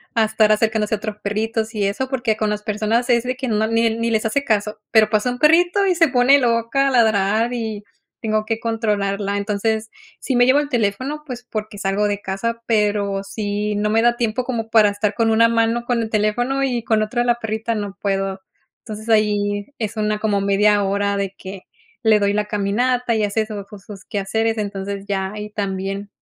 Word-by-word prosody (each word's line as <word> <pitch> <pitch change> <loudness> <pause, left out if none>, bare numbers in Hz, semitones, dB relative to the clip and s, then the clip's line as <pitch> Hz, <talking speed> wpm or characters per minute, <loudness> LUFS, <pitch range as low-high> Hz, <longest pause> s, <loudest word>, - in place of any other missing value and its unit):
a 225 - +4
estar 215 0 +3
acercándose 215 0 +1
a - - -6
otros 210 0 -6
perritos 220 +2 -2
y 210 - 0
eso, 200 +7 -1
porque 245 -5 0
con 215 -1 0
las 210 0 -3
personas 220 +3 0
es 235 -1 +3
de 255 +1 -2
que 260 0 -4
no 220 -1 +1
ni 230 +1 +2
ni 230 0 -1
les 220 -1 0
hace 280 +6 0
caso, 210 -4 -1
pero 220 -2 +5
pasa 215 +3 +1
un 245 - -3
perrito 350 +7 +4
y 370 -2 +2
se 330 -1 +4
pone 260 +2 +4
loca, 235 +2 +1
a - - +1
ladrar 220 -1 +2
y 220 -3 -4 0.4
tengo 215 -1 0
que 225 +1 -2
controlarla. 205 -3 -1
Entonces, 215 +2 -1 0.3
sí 265 - -2
me 245 0 +5
llevo 260 +3 +4
el 295 - -1
teléfono, 255 +5 -1
pues 245 -3 -7
porque 215 -1 -5
salgo 195 +1 0
de 205 -1 -2
casa, 230 +5 -3
pero 205 -3 0
sí, 205 +1 -3
no 210 +1 0
me 225 +1 +3
da 240 +1 +3
tiempo 235 +1 -1
como 230 -3 -3
para 220 -2 +5
estar 205 +1 -1
con 230 -1 +1
una 225 +1 +5
mano 230 +1 +1
con 240 -1 0
el 220 - -3
teléfono 245 +6 0
y 245 -4 -1
con 220 -1 +1
otra 240 +3 -1
la 240 0 +2
perrita, 220 0 -3
no 205 -2 -4
puedo. 195 -1 -1 0.4
Entonces 215 0 -9
ahí 205 -1 +1
es 220 -1 -4
una 215 -1 0
como 210 -2 0
media 205 +1 +3
hora 200 +1 0
de 200 -1 -2
que 190 0 -9 0.4
le 220 -2 +5
doy 200 0 +1
la 210 0 0
caminata 230 +4 0
y 215 - +1
hace 210 +2 0
su 210 -2 -6
ju 205 +1 -12
sus 195 0 -11
quehaceres. 225 +2 -1
Entonces, 200 -1 -4
ya 190 -1 -2
ahí 210 0 -7
también. 195 0 -4
215 Hz, 210 wpm, -20 LUFS, 205-230 Hz, 0.4 s, pero